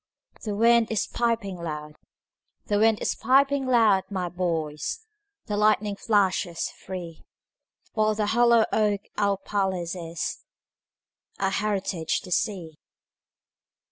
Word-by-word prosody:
The 210 Hz, -2 st, -3 dB
wind 230 Hz, +1 st, +4 dB
is 220 Hz, -, 0 dB
piping 230 Hz, -5 st, -1 dB
loud; 150 Hz, -3 st, -6 dB, 0.7 s
The 205 Hz, -1 st, +1 dB
wind 220 Hz, 0 st, +4 dB
is -, -, +1 dB
piping 275 Hz, +2 st, +2 dB
loud, 220 Hz, -6 st, +4 dB
my 185 Hz, -3 st, -2 dB
boys, 170 Hz, -, -3 dB, 0.4 s
The 210 Hz, -, -3 dB
lightning 210 Hz, 0 st, +2 dB
flashes 190 Hz, -5 st, 0 dB
free—While 190 Hz, +4 st, -6 dB
the 210 Hz, 0 st, 0 dB
hollow 235 Hz, +1 st, +4 dB
oak 210 Hz, -2 st, +2 dB, 0.2 s
our 200 Hz, -1 st, +2 dB
palace 190 Hz, -3 st, -2 dB
is, 165 Hz, -1 st, -4 dB, 1.0 s
Our 195 Hz, 0 st, +1 dB
heritage 195 Hz, -5 st, -1 dB
the 180 Hz, -, -11 dB
sea. 175 Hz, -6 st, -2 dB
205 Hz, 110 wpm, -26 LUFS, 180-220 Hz, 1.0 s, wind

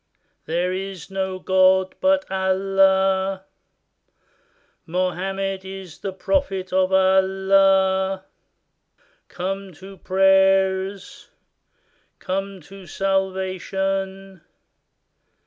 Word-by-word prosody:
There 175 Hz, +3 st, -1 dB
is 195 Hz, 0 st, -6 dB
no 190 Hz, -1 st, -3 dB
God 185 Hz, 0 st, +3 dB
but 285 Hz, 0 st, +2 dB
Allah! 190 Hz, 0 st, +1 dB, 1.4 s
Mohammed 190 Hz, +2 st, -2 dB
is 190 Hz, -3 st, -9 dB
the 195 Hz, -, -4 dB
prophet 190 Hz, -3 st, -2 dB
of 185 Hz, 0 st, +2 dB
Allah! 190 Hz, 0 st, +3 dB, 1.0 s
Come 195 Hz, +1 st, -5 dB
to 190 Hz, +5 st, -13 dB
prayers! 195 Hz, +5 st, +1 dB, 0.9 s
Come 195 Hz, 0 st, -4 dB
to 195 Hz, +3 st, -13 dB
salvation! 190 Hz, 0 st, -2 dB
190 Hz, 70 wpm, -22 LUFS, 190-195 Hz, 1.4 s, God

